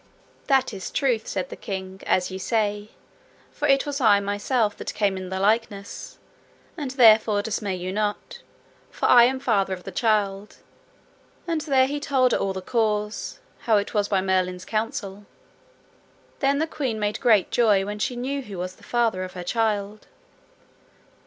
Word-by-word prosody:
That 265 -4 +2
is 190 -2 -6
truth, 245 -5 0
said 190 -2 -3
the - - -7
king, 190 -1 -6
as 185 0 +1
ye 190 - -5
say; 210 0 -1 0.6
for 295 - -2
it 275 -1 +3
was 285 -1 -3
I 210 -4 +5
myself 205 +2 0
that - - -6
came 200 -2 +1
in 185 -1 -6
the 190 0 -3
likeness, 205 -1 -1 0.6
and 295 -6 -4
therefore 220 -5 +5
dismay 205 -3 -2
you 185 +1 -5
not, 210 0 -3 0.5
for - - -4
I 240 -1 +8
am 260 +2 0
father 200 -7 +1
of 180 - -14
the 195 - -7
child; 205 -1 0 0.9
and 330 -2 -1
there 270 -4 +3
he 290 +2 -3
told 265 -3 +2
her - - +1
all 195 -1 -1
the 190 -1 -6
cause, 210 -1 -1 0.2
how 220 -3 +2
it 200 - -2
was 205 -1 +1
by 195 -2 +1
Merlin's 185 -1 -1
counsel. 205 -2 -4 1.1
Then 280 0 +2
the 315 - +1
queen 265 -8 -3
made 210 0 -1
great 220 -7 +3
joy 210 -5 +3
when 210 +1 -5
she 245 - -1
knew 270 +3 -3
who 205 -7 -9
was 185 +1 -5
the - - -21
father 230 -6 0
of 185 - -7
her 180 - -6
child. 210 0 -1
210 Hz, 170 wpm, -24 LUFS, 195-245 Hz, 1.1 s, I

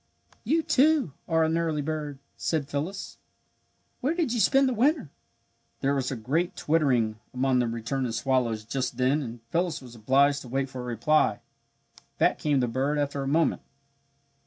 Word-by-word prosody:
"You, 325 +1 +1
too, 295 - +3
are 165 -1 +3
an 160 +1 +1
early 160 -3 -1
bird," 150 -2 -4 0.2
said 155 -4 -1
Phyllis. 155 +8 -4 0.8
"Where 290 +6 0
did 325 -9 0
you 240 - 0
spend 270 +4 +4
the 255 - 0
winter?" 255 - +1 0.7
There 140 +1 +2
was 135 -2 -1
a 135 - -3
great 145 +10 -1
twittering 125 -9 +1 0.2
among 130 0 +2
the 120 - +1
returning 115 +2 -2
swallows 115 -2 0
just 125 +1 -3
then 130 +4 +2
and 120 -3 -7
Phyllis 170 -1 0
was 125 -3 -12
obliged 140 +5 +3
to - - -10
wait 135 +1 -1
for 130 -2 -6
a - - -6
reply. 125 +6 +2 0.8
Back - - +2
came 145 -3 +1
the 125 - +1
bird 135 +5 0
after 145 -1 -1
a 135 - -3
moment. 160 +4 +2
140 Hz, 170 wpm, -27 LUFS, 125-165 Hz, 0.8 s, spend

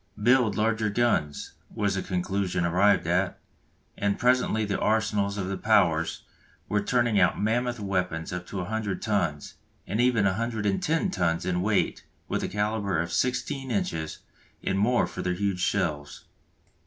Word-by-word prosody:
"Build 120 -3 +4
larger 110 0 +1
guns" 100 -10 0 0.2
was 100 -2 -1
the 95 - -1
conclusion 90 -1 -1
arrived 90 +2 +3
at, 90 +3 0 0.6
and 100 0 0
presently 125 -3 +2
the 100 -1 -2
arsenals 105 -2 +1
of 95 -2 -2
the 95 0 -3
Powers 85 -7 +2 0.4
were 105 0 +1
turning 120 -1 +2
out 90 -1 +3
mammoth 120 +3 0
weapons 90 -5 -2
up 90 0 -5
to 100 - -6
100 100 +1 -2
tons, 90 -9 -1 0.3
and 105 +6 -1
even 120 -5 +3
110 110 - 0
tons 85 - 0
in 90 -1 0
weight 105 +1 0 0.2
with - - -1
a - - -1
calibre 105 -3 -1
of 85 - -6
16 130 +2 -1
inches 80 -8 -2 0.5
and 95 0 0
more 120 +4 +3
for 90 - -6
their 90 -1 -1
huge 100 -1 -1
shells. 80 -7 -2
100 Hz, 150 wpm, -27 LUFS, 90-110 Hz, 0.6 s, Build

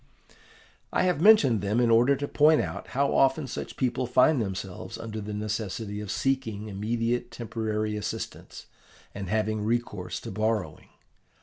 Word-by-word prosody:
"I - - +2
have 180 -4 +1
mentioned 150 - +6
them 100 +4 0
in 120 -1 +3
order 120 +5 +5
to 145 +1 -4
point 155 +2 +4
out - - -4
how 140 0 +2
often 135 +2 +3
such 125 - -6
people 130 -1 0
find 125 +3 +4
themselves 95 -2 -5
under 110 -1 -6
the 105 +1 -6
necessity 105 0 -3
of 105 - -7
seeking 110 -3 -1
immediate 115 +4 -1
temporary 110 -2 -3
assistance 105 -1 -6 0.5
and 100 -2 -6
having 110 0 0
recourse 120 +2 -2
to - - -7
borrowing. 110 0 -2
115 Hz, 145 wpm, -27 LUFS, 105-130 Hz, 0.5 s, mentioned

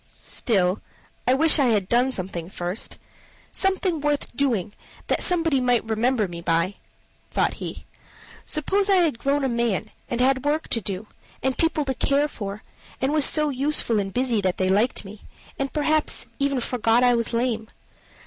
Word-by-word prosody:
"Still, 190 -4 0 0.5
I 255 - +5
wish 315 +2 +6
I 275 - +4
had 210 -5 +1
done 245 +4 +2
something 180 -5 -4
first 180 +2 -3 0.5
something 380 -4 0
worth 290 -4 -1
doing, 235 -8 0 0.3
that - - 0
somebody 330 -6 +2
might 245 -2 +2
remember 225 0 +1
me 170 -1 -8
by," 170 +3 0 0.5
thought - - +1
he. - - -6 0.6
"Suppose 390 +7 0
I 395 - +5
had 330 -10 +2
grown 280 +2 0
a - - +2
man, 235 -4 -1 0.2
and 240 - -2
had 260 +1 +4
had 260 - -9
work 300 +2 0
to 230 - 0
do, 195 +1 -4 0.4
and 265 0 +1
people 325 -2 +1
to 265 - -1
care 280 +3 +1
for, 205 -6 -7 0.4
and 265 +3 0
was 305 -2 +4
so 305 -1 +3
useful 275 -4 +1
and 195 -1 -3
busy 245 -2 0
that 185 -2 0
they 185 0 +1
liked 210 +3 +1
me, 205 +2 -11 0.4
and 275 0 -1
perhaps 310 0 +1
even 280 -2 +1
forgot 235 0 +2
I 245 0 +5
was 230 -1 -1
lame? 230 -2 -1
250 Hz, 175 wpm, -24 LUFS, 210-290 Hz, 0.6 s, wish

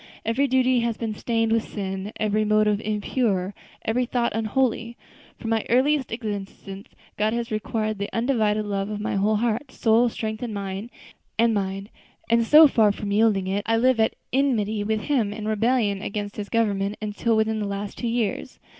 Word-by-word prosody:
Every 255 +5 +1
duty 255 -1 +3
has 235 -1 -1
been 225 -2 -3
stained 225 +1 0
with 225 0 +1
sin, 195 0 -4
every 215 0 +1
motive 215 0 +2
impure, 210 -2 -1 0.3
every 245 +2 0
thought 240 -1 0
unholy. 230 +1 -1 0.4
From 225 - -4
my 225 -1 +1
earliest 265 +2 +2
existence, 205 -3 -6 0.3
God 215 +1 +1
has 235 -1 -3
required 215 -1 -2
the 200 - -3
undivided 220 -3 +1
love 200 -1 -2
of 210 -1 -4
my 210 - -2
whole 210 +2 +2
heart, 235 +5 -1
soul, 230 +2 +3
strength, 220 -1 -4
and 235 -4 -4
mind; 200 +2 -5 0.5
and 215 +1 -1
so 300 +7 +8
far 220 -6 +4
from 205 0 -5
yielding 205 -2 +3
it, 195 +2 -1
I 225 0 +3
live 255 0 +3
at 220 - +2 0.2
enmity 220 -6 +1
with 215 +1 -1
Him, 240 -8 0
and 215 0 -5
rebellion 215 -2 +1
against 205 0 -4
His 205 -1 -5
government, 205 -3 0
until 215 +2 -1
within 220 0 +1
the 205 - -2
last 200 0 -5
two 240 - -2
years. 230 -3 -2
220 Hz, 170 wpm, -24 LUFS, 205-235 Hz, 0.5 s, so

